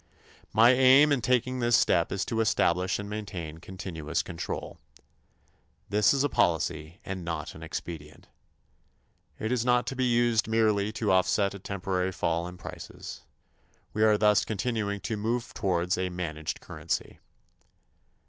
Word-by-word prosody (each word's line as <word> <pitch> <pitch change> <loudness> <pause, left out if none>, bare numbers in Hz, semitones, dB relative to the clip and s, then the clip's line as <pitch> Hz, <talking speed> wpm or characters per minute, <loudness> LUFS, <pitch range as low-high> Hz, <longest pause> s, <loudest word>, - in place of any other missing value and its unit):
My 115 +3 +6
aim 130 +3 +6
in 140 -3 +2
taking 125 +2 +1
this 120 -1 +3
step 85 -3 +2
is 95 - -1
to 115 -1 -1
establish 90 -4 +2
and 100 - -6
maintain 90 -7 -6
continuous 85 -3 -4
control. 85 - -6 1.1
This 105 0 +4
is 140 0 +2
a - - +3
policy 80 - 0
and 95 -2 -5
not 80 -3 -4
an - - -12
expedient. 80 -3 -7 1.1
It 110 - -3
is 125 -2 +1
not 125 0 +3
to 135 - -4
be 130 0 0
used 120 -2 +2
merely 110 -2 +2
to 110 -2 0
offset 95 +2 +2
a 100 - -8
temporary 95 -1 -2
fall 85 -1 -1
in 90 0 -9
prices. - - -9 0.7
We 110 - -2
are 110 -1 +5
thus 105 -1 +4
continuing 105 -2 -2
to 110 - -3
move 115 +4 -2
towards 90 -1 0
a 95 0 -1
managed 80 -4 -4
currency. 80 0 -4
100 Hz, 150 wpm, -28 LUFS, 90-115 Hz, 1.1 s, My